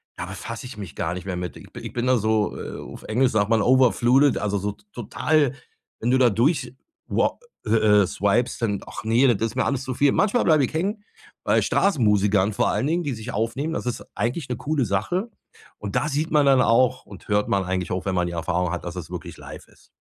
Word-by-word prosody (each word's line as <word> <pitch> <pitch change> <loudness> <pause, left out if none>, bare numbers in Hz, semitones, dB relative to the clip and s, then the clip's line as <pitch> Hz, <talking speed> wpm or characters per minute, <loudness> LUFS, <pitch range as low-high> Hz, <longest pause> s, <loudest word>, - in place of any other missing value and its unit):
da - - -5
befasse - - -7
ich 125 -3 -9
mich 95 -9 -8
gar 80 - -2
nicht 90 -1 -7
mehr 95 -2 -3
mit. 90 -3 -5
Ich - - -14
bi - - -8
ich - - -8
bin 120 +1 -1
da 130 0 +4
so, 110 -1 0
äh, - - -7
auf - - -10
Englisch 125 +4 +1
sagt 105 -1 +1
man, 115 -1 +3
overflooded, 130 +2 +4
also 100 0 -1
so 100 +1 -2 0.2
total, 140 +4 +1 0.5
wenn 120 - 0
du 130 - +4
da 125 -2 +5
durch 125 - 0 0.3
wa - - 0 0.3
äh - - -3 0.3
äh, - - -1
swipst 115 +8 0
dann 100 -4 0
ach - - -8
ne, 115 +5 +3
das 115 +3 -1
ist 110 - -12
mir 130 - +1
alles 140 -2 -1
zu 130 -1 -4
viel. 140 +2 +3
Manchmal 210 +5 +2
bleibe 155 -3 +4
ich - - -8
hängen 200 +6 -2 0.4
bei - - +3
Straßenmusikern 105 - +2
vor - - +1
allen 135 - 0
Dingen, 170 +2 0
die 145 -4 -2
sich 115 +1 -7
aufnehmen. 120 +9 -2
Das - - -4
ist 120 -1 -3
eigentlich 125 +6 -2
'ne 125 - -1
coole 145 -2 -1
Sache. 110 - -1 0.5
Und 100 -1 -6
da 150 - 0
sieht 155 +3 -2
man 150 -2 +4
dann 135 -2 +5
auch 125 +2 +2
und 100 -2 -13
hört 105 0 +1
man 100 -1 +1
eigentlich 90 0 -2
auch, 90 0 -2
wenn 95 -2 -1
man 90 -1 +1
die 85 - -5
Erfahrung 85 +1 -1
hat, 90 0 -4
dass 85 +1 -6
es 90 -2 -7
wirklich 90 -2 -7
live - - -11
ist. - - -24
115 Hz, 235 wpm, -23 LUFS, 100-135 Hz, 0.5 s, da